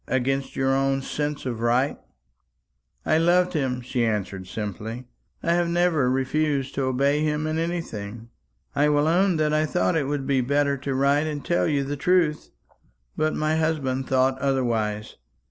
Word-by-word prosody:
Against 135 +1 -1
your 135 0 +1
own 135 0 +1
sense 145 0 -3
of 120 -3 -3
right?" 120 +4 +1 1.1
"I 155 - +3
loved 180 +2 +3
him," 130 -5 -1
she 120 0 -1
answered 100 -4 -2
simply. 110 +4 -5 0.4
"I 170 - +2
have 175 0 +2
never 170 -6 +2
refused 135 +1 0
to 135 - -1
obey 140 +3 +1
him 150 0 0
in 155 +1 -1
anything. 115 -10 -4 0.5
I 145 +1 +3
will 145 0 +2
own 180 +2 +3
that 155 -1 +1
I 155 0 +2
thought 95 -9 +1
it 150 -4 0
would 145 -1 -2
be 135 -2 +2
better 140 +2 +1
to 135 0 -3
write 140 +3 +2
and 150 -2 -5
tell 175 - +1
you 145 -3 +1
the 145 +1 -4
truth; 165 -1 +1 0.7
but 155 0 0
my 155 +1 0
husband 135 -5 -1
thought 130 0 +2
otherwise. 115 -6 -1
140 Hz, 165 wpm, -24 LUFS, 130-155 Hz, 1.1 s, I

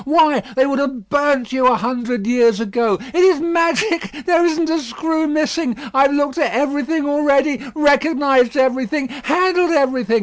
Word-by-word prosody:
Why, 305 -2 +3 0.2
they 260 0 +3
would 275 0 -1
have 260 -8 -4
burnt 285 -4 0
you 260 -1 +2
a 250 - +4
hundred 240 -1 -3
years 235 -2 +2
ago! 225 -2 -1 0.2
It 350 - -1
is 365 -4 +4
magic! 335 -1 -1
There 345 -1 +2
isn't 335 -1 0
a 325 0 -1
screw 315 +5 -3
missing. 305 -4 -2 0.2
I 270 +1 +4
have 280 - -4
looked 285 +1 -1
at 290 - 0
everything 290 +4 -1
already, 285 -2 +1
recognised 285 -3 +2
everything, 260 +1 -1
handled 345 +7 0
everything. 255 -5 +1
285 Hz, 165 wpm, -17 LUFS, 255-315 Hz, 0.2 s, a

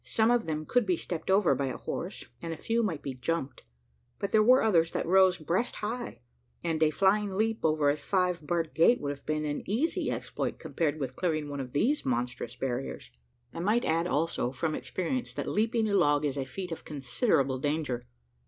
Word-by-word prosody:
Some 225 +1 +2
of 240 -5 +2
them 155 -1 -2
could 245 +1 +2
be 180 -2 +2
stepped 165 0 -5
over 190 -5 +4
by 135 +1 -1
a 130 - -4
horse, - - -5 0.2
and 165 - -4
a 165 - -4
few 230 +7 0
might 170 -10 -2
be 135 - -3
"jumped," 140 +2 -3 0.6
but 200 -1 -3
there 215 - +5
were 250 +4 +6
others 170 -7 +4
that - - -1
rose 185 +1 +5
breast 175 +9 -1
high; 235 +3 -4 0.4
and 160 -2 -1
a 155 - +5
flying 195 +4 +2
leap 225 +2 +1
over 155 -2 +2
a - - 0
five 180 -3 0
barred 170 -2 -1
gate 200 +10 +5
would 145 - -2
have 140 -1 -10
been 155 0 0
an 145 -1 -2
easy 255 +11 0
exploit, - - -3
compared 155 -3 -2
with 130 -2 -4
clearing 155 -5 -1
one 140 -1 -4
of 125 -2 -6
these 265 - +2
monstrous 125 -1 -2
barriers. 130 0 -4 0.4
I - - -6
might 210 +7 +2
add, 165 +2 +1
also, 150 -6 0
from 155 +4 -2
experience, 240 +12 -3
that - - -3
leaping 225 +1 +1
a 205 - -1
log 145 -5 +3
is 140 -2 -1
a 135 -2 -2
feat 185 +4 -6
of 165 - -5
considerable 135 - 0
danger. 145 - -2
165 Hz, 205 wpm, -29 LUFS, 145-205 Hz, 0.6 s, were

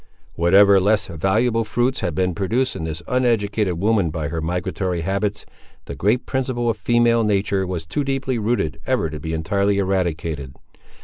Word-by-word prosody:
Whatever 95 +3 +5
less 105 +3 +2
valuable 110 +8 +1
fruits 120 +4 0
had 85 -5 -2
been 90 +1 0
produced 115 +9 -1
in 80 - -4
this 80 +1 -5
uneducated 110 -7 +1
woman 100 -2 +2
by 80 -1 -3
her 80 0 -3
migratory 90 +1 -2
habits, 100 +4 -2 0.4
the - - -6
great 105 - 0
principle 125 -3 -1
of 110 - -6
female 115 +2 +2
nature 100 -2 0
was 90 -3 -4
too 120 - -2
deeply 135 -2 -1
rooted 105 -9 -1
ever 125 - 0
to 75 - -6
be 80 +2 -5
entirely 100 +5 0
eradicated. 85 -8 -2
100 Hz, 165 wpm, -21 LUFS, 85-115 Hz, 0.4 s, Whatever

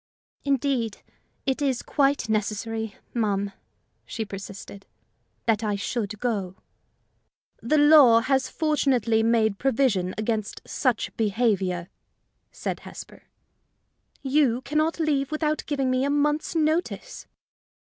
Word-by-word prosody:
"Indeed, 270 -5 -1 0.4
it 265 +1 0
is 265 -4 0
quite 280 -4 +1
necessary, 220 0 -2 0.2
ma'am," 205 -3 0 0.5
she 220 - -5
persisted, 195 0 -9 0.6
"that 225 -1 +2
I 210 -1 0
should 210 0 -3
go." 200 -7 -2 1.1
"The 300 +7 +2
law 290 -6 +7
has 265 +2 +1
fortunately 270 -8 +1
made 220 -3 +2
provision 225 -9 +1
against 215 -1 -2
such 250 -4 -1
behavior," 195 -5 0 0.6
said - - -4
Hesper. - - -11 1.0
"You 265 -3 +2
can 300 +2 0
not 320 +2 0
leave 285 -4 +1
without 310 0 -1
giving 275 -3 0
me 255 +1 +1
a 280 - +1
month's 295 +3 0
notice." 325 +10 -1
240 Hz, 110 wpm, -25 LUFS, 215-285 Hz, 1.1 s, law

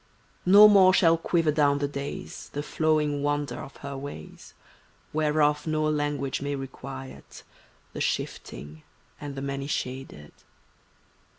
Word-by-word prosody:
No 205 +3 +10
more 190 -3 +6
shall 165 -2 +5
quiver 165 -1 +1
down 145 -2 +3
the 145 0 -1
days 140 0 -7
The 145 - -3
flowing 150 -2 0
wonder 145 -3 -1
of 135 - -9
her 140 0 -5
ways, 135 - -9 0.6
Whereof 150 0 +1
no 155 0 0
language 145 -3 -1
may 145 0 -2
requite 135 0 -9 0.5
The - - -5
shifting 75 +5 -4 0.4
and 145 -1 -7
the 135 - -5
many 140 0 -4
shaded. 130 - -5
145 Hz, 125 wpm, -26 LUFS, 135-155 Hz, 0.6 s, No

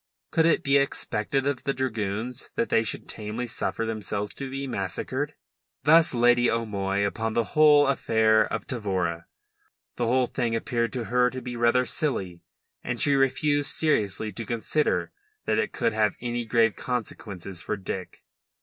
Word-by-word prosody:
Could 160 0 +3
it 165 - +2
be 140 +1 +4
expected 135 -1 0
of 140 -2 -1
the 140 - -1
dragoons 115 -1 -3
that 115 - 0
they 115 - +3
should 110 -2 -3
tamely 110 +3 -4
suffer 115 -1 -2
themselves 105 -2 -3
to 135 -1 -6
be 135 +1 -4
massacred? 130 +6 -3 0.5
Thus 160 +3 +6
Lady 120 0 +4
O'Moy 100 -3 -1
upon 110 +2 -2
the 115 - +2
affair 135 -8 +4
of 115 - -3
Tavora. 95 -8 -2 0.7
The 120 - 0
whole 125 +2 +3
thing 115 -1 -2
appeared 115 0 -1
to 125 - -2
her 125 +3 +2
to 130 - -6
be 125 -1 -5
rather 120 +2 +3
silly, 95 - -2 0.4
and - - -3
she 145 - +4
refused 145 +2 +2
seriously 110 -8 +1
to 115 - -6
consider 120 +7 0 0.3
that - - +1
it - - -1
could 115 -3 0
have 105 -1 +1
any 120 -1 -3
grave 115 -1 +2
consequences 100 -7 -5
for 105 - -3
Dick. 95 -1 -6
115 Hz, 160 wpm, -26 LUFS, 105-130 Hz, 0.7 s, Thus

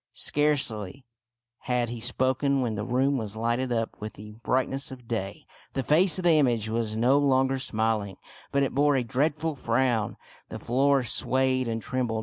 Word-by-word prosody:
Scarcely 135 -7 0 0.6
had 125 -2 0
he 120 0 -6
spoken 130 +3 +1
when 120 -3 -1
the 105 0 -3
room 130 +4 +1
was 110 -2 -6
lighted 120 +3 -1
up 115 -1 -2
with 105 0 -5
the 105 +1 -11
brightness 130 +4 -1
of 125 -3 -11
day. 100 -5 -4 0.3
The 135 - -2
face 170 +8 +4
of 185 - -3
the 165 -3 +5
image 120 -6 +1
was 110 -1 -2
no 125 +5 +3
longer 135 -1 +2
smiling, 110 -5 -1 0.3
but 140 0 +2
it 135 - -2
bore 145 +1 +3
a 130 - +1
dreadful 150 +5 -1
frown. 120 -3 0 0.3
The - - -6
floor 135 +2 +2
swayed 130 +1 0
and 115 -1 -3
trembled. 120 -4 -2
125 Hz, 170 wpm, -26 LUFS, 115-135 Hz, 0.6 s, the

